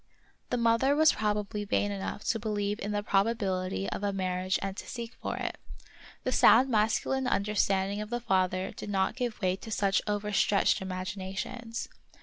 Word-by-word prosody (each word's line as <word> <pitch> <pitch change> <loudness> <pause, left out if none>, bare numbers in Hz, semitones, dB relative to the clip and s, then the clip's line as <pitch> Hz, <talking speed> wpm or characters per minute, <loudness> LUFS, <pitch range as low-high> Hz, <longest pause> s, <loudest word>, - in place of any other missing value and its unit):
The 245 - 0
mother 235 +4 +3
was 315 +1 +6
proba 210 -1 0
bly 210 +1 -4
vain 205 0 0
enough 200 +1 -4
to 225 - +1
believe 205 -1 -2
in 205 - -3
the 205 0 -1
probability 195 - 0
of - - -4
a 200 - +1
marriage 185 -1 -1
and 195 -1 -4
to - - -7
seek 235 -1 -6
for - - -3
it; - - -4 0.6
the 255 - 0
sound 245 +2 +6
masculine 230 +4 +1
understanding 200 -1 +1
of 210 - -6
the 240 +1 -1
father 185 -3 0
did - - -8
not 195 +1 +1
give 245 -3 -3
way 185 0 +2
to 225 - -10
such 200 -3 +2
overstretched 205 -1 +2
imaginations. 190 +5 -5
205 Hz, 170 wpm, -29 LUFS, 190-225 Hz, 0.6 s, was